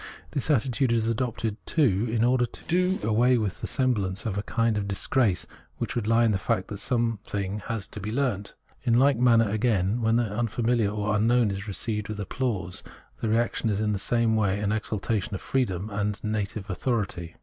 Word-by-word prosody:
This 140 Hz, -, -2 dB
attitude 130 Hz, -2 st, +2 dB
is 115 Hz, -1 st, +2 dB
adopted, 115 Hz, -2 st, -1 dB
too, 120 Hz, -, +2 dB
in 115 Hz, 0 st, +1 dB
order 120 Hz, 0 st, +3 dB
to -, -, -9 dB
do 180 Hz, +2 st, +2 dB
away 120 Hz, +3 st, +4 dB
with 105 Hz, -5 st, -2 dB
the -, -, -3 dB
sem 130 Hz, -1 st, +2 dB
blance 95 Hz, -2 st, -3 dB
of 105 Hz, -4 st, -1 dB
a 100 Hz, -, -1 dB
kind 115 Hz, +1 st, 0 dB
of 100 Hz, -1 st, -2 dB
disgrace 100 Hz, 0 st, +1 dB, 0.3 s
which -, -, -3 dB
would 115 Hz, -3 st, -1 dB
he -, -, +2 dB
in 115 Hz, -1 st, +4 dB
the 95 Hz, -, 0 dB
fact 95 Hz, -, -1 dB
that 100 Hz, -, -6 dB
something 105 Hz, -5 st, -1 dB
has 115 Hz, -3 st, -2 dB
had -, -, -25 dB
to -, -, -7 dB
be 105 Hz, +1 st, -4 dB
learnt. 115 Hz, -6 st, -1 dB, 0.3 s
In 115 Hz, -, +2 dB
like 135 Hz, -1 st, +4 dB
manner, 115 Hz, -2 st, +5 dB
again, 105 Hz, 0 st, +1 dB
when 115 Hz, 0 st, +2 dB
the 120 Hz, -, +3 dB
unfamihar 115 Hz, 0 st, 0 dB
or 105 Hz, 0 st, -1 dB
unknown 115 Hz, +1 st, +3 dB
is 100 Hz, +2 st, -5 dB
received 105 Hz, +1 st, -2 dB
with 105 Hz, -1 st, -5 dB
applause, 100 Hz, -4 st, -3 dB, 0.4 s
the 110 Hz, -, 0 dB
reaction 115 Hz, 0 st, +1 dB
is 100 Hz, -1 st, 0 dB
in 105 Hz, -1 st, +1 dB
the 100 Hz, -, -2 dB
same 115 Hz, +1 st, +1 dB
way 100 Hz, -2 st, +1 dB
an 105 Hz, 0 st, 0 dB
exaltation 105 Hz, -1 st, -2 dB
of -, -, -6 dB
freedom 105 Hz, -6 st, -1 dB
and 105 Hz, +1 st, -2 dB
native 105 Hz, -1 st, -2 dB
authority. 95 Hz, -6 st, -2 dB
110 Hz, 205 wpm, -26 LUFS, 100-120 Hz, 0.4 s, manner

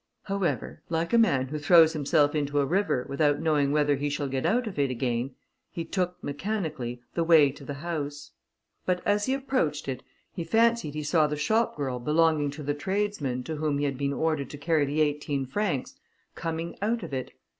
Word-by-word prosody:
However, 195 Hz, -3 st, -2 dB
like 165 Hz, +4 st, -1 dB
a -, -, +6 dB
man 135 Hz, -, +3 dB
who 150 Hz, +1 st, -3 dB
throws 160 Hz, +1 st, +6 dB
himself 145 Hz, -1 st, +2 dB
into 145 Hz, -1 st, 0 dB
a 140 Hz, -, +3 dB
river 175 Hz, -6 st, +1 dB
without 145 Hz, +1 st, +1 dB
knowing 150 Hz, -3 st, +2 dB
whether 145 Hz, -1 st, +2 dB
he 145 Hz, +1 st, -1 dB
shall 145 Hz, 0 st, -2 dB
get 135 Hz, -1 st, -1 dB
out 245 Hz, +2 st, +2 dB
of 200 Hz, -8 st, -5 dB
it 140 Hz, -1 st, +2 dB
again, 125 Hz, +1 st, -2 dB, 0.3 s
he 165 Hz, -, -5 dB
took, 180 Hz, -2 st, -2 dB
mechanically, 145 Hz, -, -3 dB
the 170 Hz, -, +1 dB
way 160 Hz, -4 st, +6 dB
to 140 Hz, -, -13 dB
the 140 Hz, +1 st, -5 dB
house; 145 Hz, -2 st, -5 dB, 0.5 s
but 180 Hz, -1 st, -1 dB
as 205 Hz, 0 st, +2 dB
he 265 Hz, -, +2 dB
approached 255 Hz, -, -1 dB
it, 130 Hz, -2 st, -3 dB, 0.3 s
he 170 Hz, -, -4 dB
fancied 225 Hz, -3 st, +2 dB
he 155 Hz, -, -3 dB
saw 150 Hz, +1 st, +3 dB
the 150 Hz, -, -2 dB
shop 220 Hz, +7 st, +1 dB
girl 130 Hz, -4 st, -2 dB
belonging 150 Hz, +2 st, +2 dB
to 145 Hz, +2 st, -7 dB
the 145 Hz, +1 st, 0 dB
tradesman, 150 Hz, -6 st, -2 dB
to 155 Hz, +4 st, -4 dB
whom 150 Hz, -1 st, 0 dB
he 145 Hz, -, 0 dB
had 135 Hz, -2 st, -2 dB
been 140 Hz, 0 st, 0 dB
ordered 155 Hz, -3 st, -1 dB
to 145 Hz, -, -8 dB
carry 150 Hz, 0 st, +2 dB
the 145 Hz, +3 st, 0 dB
eighteen 145 Hz, -2 st, 0 dB
francs, 155 Hz, 0 st, -2 dB, 0.4 s
coming 165 Hz, 0 st, -4 dB
out 225 Hz, +3 st, 0 dB
of -, -, -7 dB
it. 130 Hz, -1 st, -4 dB
150 Hz, 200 wpm, -27 LUFS, 140-170 Hz, 0.5 s, a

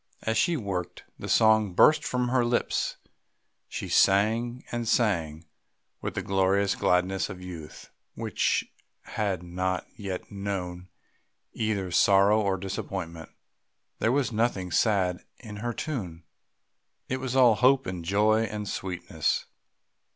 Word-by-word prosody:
As 110 Hz, -, 0 dB
she 165 Hz, +9 st, +2 dB
worked 95 Hz, -, -4 dB, 0.2 s
the -, -, -6 dB
song 110 Hz, -4 st, +4 dB
burst 155 Hz, -, +6 dB
from 125 Hz, -1 st, -1 dB
her 125 Hz, -1 st, +2 dB
lips; 120 Hz, 0 st, 0 dB, 0.7 s
she -, -, -5 dB
sang 115 Hz, +5 st, +2 dB
and 120 Hz, -1 st, -3 dB
sang, 85 Hz, -9 st, 0 dB, 0.6 s
with -, -, -4 dB
the -, -, -2 dB
glorious 95 Hz, +1 st, +2 dB
gladness 90 Hz, +2 st, +1 dB
of 95 Hz, -3 st, -7 dB
youth 85 Hz, -4 st, -10 dB, 0.2 s
which -, -, 0 dB, 0.4 s
has 100 Hz, -5 st, -2 dB
not 90 Hz, +1 st, -2 dB
yet 95 Hz, -4 st, -6 dB
known 95 Hz, -3 st, -5 dB, 0.6 s
either 105 Hz, -4 st, -2 dB
sorrow 100 Hz, +4 st, +5 dB
or 100 Hz, -2 st, 0 dB
disappointment. 90 Hz, -3 st, -5 dB, 0.7 s
There 115 Hz, -, +2 dB
was 135 Hz, -1 st, +1 dB
nothing 105 Hz, -5 st, -1 dB
sad 90 Hz, -2 st, +1 dB
in 105 Hz, -4 st, -9 dB
her 120 Hz, +3 st, -3 dB
tune, 95 Hz, -, -5 dB, 0.8 s
it 130 Hz, -, -1 dB
was 130 Hz, -1 st, -4 dB
all 125 Hz, -3 st, +6 dB
hope 130 Hz, +4 st, +3 dB
and 90 Hz, -2 st, -5 dB
joy 105 Hz, +5 st, +3 dB
and 105 Hz, -1 st, -5 dB
sweetness. 95 Hz, -2 st, -2 dB
100 Hz, 130 wpm, -27 LUFS, 90-115 Hz, 0.8 s, burst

